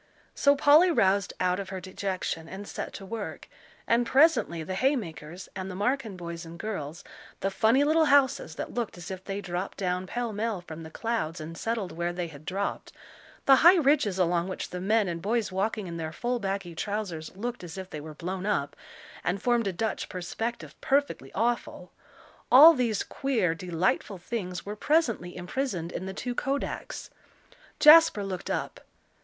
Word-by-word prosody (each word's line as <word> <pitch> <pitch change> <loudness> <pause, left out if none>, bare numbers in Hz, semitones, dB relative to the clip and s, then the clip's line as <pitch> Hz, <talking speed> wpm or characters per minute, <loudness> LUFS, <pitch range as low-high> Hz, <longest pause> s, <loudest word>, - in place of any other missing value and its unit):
So 280 0 +4
Polly 300 +5 +6
roused 195 - +2
out 180 0 +1
of 195 - -5
her 190 -1 -4
dejection 185 -3 -4
and 200 +1 -8
set - - -5
to 195 - -8
work, 220 +1 -6 0.4
and 235 +1 +3
presently 260 - +3
the 185 - -5
hay 265 +9 +2
makers, 170 - -7
and 190 0 -5
the 185 - -6
Marken 220 0 -1
boys 170 -1 -6
and 165 0 -10
girls, 170 -6 -5 0.4
the 195 - 0
funny 225 +8 +3
little 315 +2 +4
houses 275 - +3
that - - -5
looked 235 -6 -3
as 175 +2 -8
if 190 0 -6
they 195 +1 -4
dropped 180 0 -4
down 180 -1 -1
pellmell 225 -3 -2
from 165 -2 -9
the 160 - -8
clouds 185 -4 -2
and 160 +2 -7
settled 225 0 -2
where 170 +1 -2
they 175 0 -3
had 150 -1 -13
dropped 195 +1 -3 0.5
the 270 -1 +7
high 345 +6 +8
ridges 275 - +3
along 175 -1 +1
which 185 - -5
the 180 - -5
men 210 +2 +2
and 170 -1 -3
boys, 220 +2 0
walking 205 +2 -1
in 170 -2 -6
their 160 -1 -4
full 245 +7 -2
baggy 195 -4 -3
trousers, 185 -4 -4
looked 240 0 -4
as 175 +1 -8
if 190 0 -7
they 150 - -6
were 155 0 -9
blown 185 +4 -4
up, 145 -9 -1 0.5
and 180 +3 0
formed 240 -3 +2
a - - +1
Dutch 220 +5 -3
perspective 225 +6 -4
perfectly 275 - 0
awful 235 +3 -1 0.6
all 300 +6 +10
these 240 -7 0
queer, 240 -11 0
delightful 180 +3 -1
things 180 -1 -5
were 205 +1 -5
presently 230 - 0
imprisoned 180 -2 -3
in 185 - -5
the 190 - -5
two 245 - -3
kodaks. 275 +3 -3 0.7
Jasper 305 -8 +8
looked 190 -2 -5
up. - - -3
195 Hz, 180 wpm, -28 LUFS, 175-240 Hz, 0.7 s, all